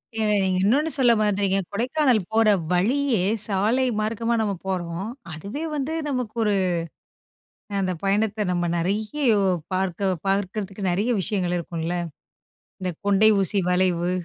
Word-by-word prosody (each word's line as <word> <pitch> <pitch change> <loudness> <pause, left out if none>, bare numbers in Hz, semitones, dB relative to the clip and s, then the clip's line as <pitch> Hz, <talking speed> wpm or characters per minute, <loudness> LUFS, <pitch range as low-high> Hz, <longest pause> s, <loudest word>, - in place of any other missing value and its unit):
ஏ. - - -3 0.2
நீங்க 185 -1 +1
இன்னொன்னு 295 +9 +2
சொல்ல 250 -3 +5
மறந்துட்டீங்க. 200 -2 +1
கொடைக்கானல் 250 +1 +2
போற 225 -1 +4 0.2
வழியே 235 +2 +2 0.2
சால 210 +4 +1 0.2
மார்க்கமா 230 +2 -1
நம்ம 205 -2 0
போறோம். 180 +2 -3 0.2
அதுவே 200 - -6
வந்து 290 +2 -2 0.2
நமக்கு 250 -4 -3
ஒரு 210 -1 +2 1.2
அ - - -3
அந்த 185 -1 0
பயணத்தை 210 +2 +1
நம்ம 175 -1 0
நறைய 210 - -2 0.5
பார்க்க 190 0 0
பார்க்கிறதுக்கு, 195 0 -2
நறைய 205 +7 0
விஷயங்கள் 185 -3 0
இருக்குல்ல. 170 +1 -3 0.8
இந்த 185 -1 -2
கொண்டை 205 +2 +5
ஊசி 195 +1 +1
வளைவு! 180 -1 +1
200 Hz, 125 wpm, -24 LUFS, 185-225 Hz, 1.2 s, சொல்ல